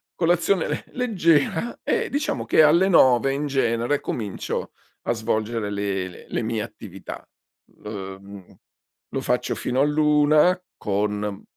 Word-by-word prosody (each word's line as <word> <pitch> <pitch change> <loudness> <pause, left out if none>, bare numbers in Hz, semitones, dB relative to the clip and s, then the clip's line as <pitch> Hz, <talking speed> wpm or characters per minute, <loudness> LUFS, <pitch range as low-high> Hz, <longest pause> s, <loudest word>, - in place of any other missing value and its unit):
colazione 175 +1 +2
le - - -3
leggera 180 - +1
e 460 0 0
diciamo 280 - -2
che 155 - +5
alle 170 +5 +5
9 130 -5 +5
in 145 +2 -2
genere 135 0 0
comincio 105 -5 -4 0.3
a - - -1
svolgere 110 -1 -2
le 100 -2 -2
le - - -13
le - - -1
mie 110 -1 -2
attività. 95 -3 -9 0.6
L 105 - -6 0.3
mhmm 100 -1 -13 0.6
lo - - -1
faccio - - 0
fino 125 +1 -2
all'1, 150 +4 +4 0.2
con 105 0 -2
130 Hz, 130 wpm, -23 LUFS, 105-160 Hz, 0.6 s, che